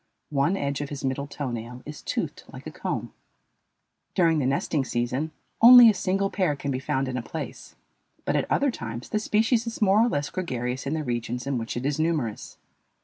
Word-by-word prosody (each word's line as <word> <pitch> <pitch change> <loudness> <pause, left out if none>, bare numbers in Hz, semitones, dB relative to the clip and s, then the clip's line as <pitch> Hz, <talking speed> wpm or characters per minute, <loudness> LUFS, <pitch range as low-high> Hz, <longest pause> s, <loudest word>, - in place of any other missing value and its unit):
One 145 +7 +2
edge 140 -2 -2
of 145 - -4
his 140 -2 -5
middle 135 +2 -2
toe 140 -2 -4
nail 120 +2 -6
is 150 0 -8
toothed - - -4
like - - -11
a - - -6
comb. - - -4 1.0
During 165 -4 +3
the 130 - +1
nesting 140 +1 0
season 125 +5 -1 0.3
only 240 -1 +10
a - - -3
single 195 +1 0
pair 180 -7 +1
can 140 0 -4
be 130 - -1
found 135 -1 -1
in 130 0 -3
a - - -2
place, 160 +7 -7 0.5
but - - 0
at - - 0
other 280 -1 +3
times 115 - -6
the 215 - 0
species 225 +2 +1
is 230 - -5
more 210 +1 +5
or - - +3
less 145 -8 -2
gregarious 130 -7 -3
in 150 - -1
the 155 - -2
regions 120 -1 -3
in 135 -3 -1
which 115 +1 -4
it 125 - -3
is 145 +1 0
numerous. 155 -10 -2
145 Hz, 205 wpm, -26 LUFS, 125-185 Hz, 1.0 s, only